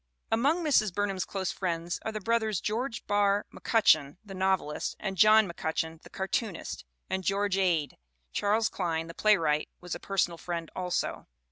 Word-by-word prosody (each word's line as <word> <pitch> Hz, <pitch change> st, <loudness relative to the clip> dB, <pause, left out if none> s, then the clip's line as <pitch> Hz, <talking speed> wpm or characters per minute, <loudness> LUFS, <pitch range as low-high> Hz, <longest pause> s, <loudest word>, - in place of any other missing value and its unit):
Among 285 Hz, +10 st, +2 dB
Mrs. 240 Hz, -10 st, +3 dB
Burnham's 195 Hz, 0 st, -1 dB
close 190 Hz, -2 st, -2 dB
friends 170 Hz, -2 st, -2 dB
are 220 Hz, -, -3 dB
the 215 Hz, -, -4 dB
brothers 220 Hz, -2 st, +1 dB
George 230 Hz, +3 st, -3 dB
Barr 205 Hz, 0 st, +2 dB
McCutcheon, 160 Hz, -11 st, +3 dB
the 195 Hz, -, -9 dB
novelist, 190 Hz, -5 st, 0 dB
and 195 Hz, -2 st, -3 dB
John 215 Hz, +3 st, +6 dB
McCutcheon, 160 Hz, -1 st, -3 dB
the -, -, -14 dB
cartoonist; 190 Hz, -, -3 dB, 0.2 s
and 190 Hz, 0 st, -2 dB
George 200 Hz, +2 st, +1 dB
Ade. 170 Hz, -6 st, +1 dB, 0.3 s
Charles 215 Hz, +2 st, +2 dB
Klein, 165 Hz, -3 st, -2 dB
the 165 Hz, -, -9 dB
playwright, 165 Hz, -8 st, +2 dB
was 180 Hz, -1 st, -6 dB
a -, -, -4 dB
personal 175 Hz, -4 st, 0 dB
friend 170 Hz, -2 st, -4 dB
also. 180 Hz, -1 st, -2 dB
195 Hz, 155 wpm, -29 LUFS, 170-215 Hz, 0.3 s, John